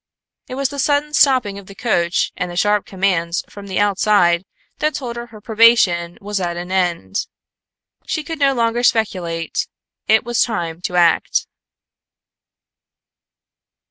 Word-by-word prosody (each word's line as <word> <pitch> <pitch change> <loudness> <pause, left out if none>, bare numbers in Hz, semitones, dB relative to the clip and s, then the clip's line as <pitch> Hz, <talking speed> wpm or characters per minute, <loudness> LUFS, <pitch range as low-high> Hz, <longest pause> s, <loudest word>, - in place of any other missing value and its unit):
It 255 - -6
was 275 0 0
the 285 - -7
sudden 290 +2 +1
stopping 250 -9 +3
of 195 - -15
the 195 - -12
coach 180 -7 0
and 180 - -3
the 175 - -7
sharp 205 +3 +1
commands 185 -3 0
from 200 -1 -11
the 190 - -4
outside 195 -3 +3 0.3
that 305 0 0
told 240 -4 -5
her 235 -2 -9
probation 210 -6 +3
was 205 -1 -3
at 175 -1 -2
an 175 +1 -6
end. 175 - -1 0.8
She 310 - -2
could 320 +1 -6
no 275 -1 +3
longer 230 0 +1
speculate; 180 -9 0 0.4
it 220 +1 +4
was 240 -1 +1
high 210 -8 -2
time 165 +2 -15
to 180 - -3
act. 175 -1 +2
205 Hz, 145 wpm, -19 LUFS, 175-240 Hz, 0.8 s, it